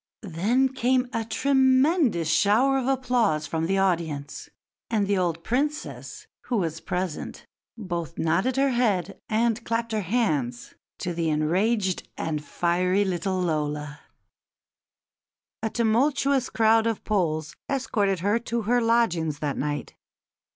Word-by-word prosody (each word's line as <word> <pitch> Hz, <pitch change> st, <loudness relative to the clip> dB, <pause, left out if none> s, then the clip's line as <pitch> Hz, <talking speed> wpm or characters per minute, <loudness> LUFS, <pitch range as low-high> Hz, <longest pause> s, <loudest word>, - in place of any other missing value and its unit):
Then 215 Hz, +9 st, +1 dB
came 255 Hz, 0 st, +1 dB
a 225 Hz, -, -1 dB
tremendous 265 Hz, -, +2 dB
shower 240 Hz, +11 st, +3 dB
of 255 Hz, -, -3 dB
applause 245 Hz, -, +1 dB
from 160 Hz, 0 st, -2 dB
the 195 Hz, +2 st, +1 dB
audience, 165 Hz, -7 st, -1 dB, 0.4 s
and 215 Hz, -3 st, +1 dB
the 200 Hz, -1 st, +1 dB
old 170 Hz, -2 st, -1 dB
Princess, 290 Hz, +5 st, -3 dB, 0.2 s
who 245 Hz, -, -1 dB
was 165 Hz, -4 st, -2 dB
present, 180 Hz, -3 st, -4 dB, 0.3 s
both 170 Hz, -6 st, -5 dB
nodded 180 Hz, +11 st, +1 dB
her 275 Hz, 0 st, +3 dB
head 220 Hz, -8 st, 0 dB
and 230 Hz, +1 st, +1 dB
clapped 230 Hz, 0 st, -2 dB
her 215 Hz, -1 st, 0 dB
hands 155 Hz, -, -1 dB, 0.2 s
to 175 Hz, -, -3 dB
the 165 Hz, -1 st, -1 dB
enraged 185 Hz, +6 st, 0 dB
and 150 Hz, -2 st, -3 dB
fiery 180 Hz, +5 st, +1 dB
little 185 Hz, 0 st, -1 dB
Lola." 150 Hz, -3 st, -2 dB, 1.6 s
A 220 Hz, -, -1 dB
tumultuous 255 Hz, +4 st, +1 dB
crowd 225 Hz, 0 st, +3 dB
of 225 Hz, -2 st, -2 dB
Poles 155 Hz, -7 st, -1 dB
escorted 205 Hz, -9 st, 0 dB
her 205 Hz, +5 st, +2 dB
to 235 Hz, -1 st, -3 dB
her 245 Hz, +3 st, +2 dB
lodgings 185 Hz, -10 st, +1 dB
that 145 Hz, -2 st, -2 dB
night. 145 Hz, +1 st, -3 dB
205 Hz, 130 wpm, -25 LUFS, 165-235 Hz, 1.6 s, shower